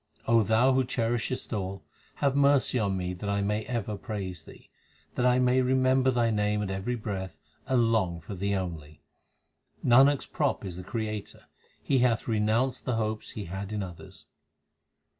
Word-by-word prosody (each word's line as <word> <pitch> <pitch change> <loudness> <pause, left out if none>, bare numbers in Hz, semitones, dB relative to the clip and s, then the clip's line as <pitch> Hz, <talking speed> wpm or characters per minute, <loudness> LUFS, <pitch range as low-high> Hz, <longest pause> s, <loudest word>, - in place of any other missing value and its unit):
Thou 115 +3 +4
who 130 0 +3
cherishest 120 +1 -2
all, 95 -2 -4 0.3
have 140 -1 +1
mercy 140 -2 +4
on 100 -3 0
me 90 0 -3
that 100 +3 -5
I 100 0 0
may 105 +2 -1
ever 115 -4 -3
praise 95 -5 -5
Thee; - - -15 0.5
That 125 - +1
I 125 0 +4
may 125 0 +3
remember 130 0 +3
Thy 120 -2 +2
name 105 0 0
at 95 - -3
every 95 +6 -2
breath 95 -5 -5 0.3
and 120 -3 +3
long 90 -7 +1
for 80 +5 -8
Thee 100 +2 -1
only. 80 -5 -6 0.8
Nanak 135 +4 +6
s - - -8
prop - - -1
is 90 -3 -6
the 90 - -7
Creator; 105 0 -5 0.4
he 135 - +2
hath 120 -3 +2
renounced 110 +3 +1
the 125 - 0
hopes 110 -1 -2
he 105 - -6
had 95 +3 -6
in 105 -2 -2
others. 90 -3 -11
110 Hz, 170 wpm, -28 LUFS, 95-125 Hz, 0.8 s, Nanak